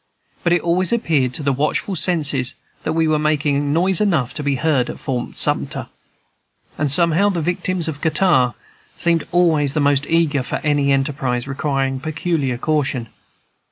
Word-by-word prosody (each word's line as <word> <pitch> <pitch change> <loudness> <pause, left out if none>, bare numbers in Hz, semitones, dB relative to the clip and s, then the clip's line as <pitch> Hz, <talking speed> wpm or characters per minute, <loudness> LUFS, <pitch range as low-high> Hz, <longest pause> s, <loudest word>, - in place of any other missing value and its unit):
But 170 - +1
it 175 - +1
always 175 +1 +1
appeared 160 - +1
to 150 - -4
the 140 -1 +1
watchful 150 +8 -1
senses 145 -7 +2 0.3
that - - -2
we 165 0 +1
were 155 -1 +1
making 145 -2 0
noise 180 +4 +2
enough 155 - +1
to - - -5
be 145 -1 0
heard 135 -3 0
at - - -6
Fort 125 -3 -4
Sumter; - - 0 0.9
and 145 -2 -1
somehow 170 +5 +4
the 180 -4 -2
victims 175 +1 -1
of 150 -2 -5
catarrh 155 - +2 0.4
seemed 170 -2 0
always 160 -5 +2
the - - +1
most 145 -1 +2
eager 160 -4 +1
for 125 - -4
any 145 -2 +1
enterprise 135 -2 -1
requiring 135 -1 -2
peculiar 155 -3 -2
caution. 135 -4 -1
150 Hz, 160 wpm, -19 LUFS, 135-170 Hz, 0.9 s, somehow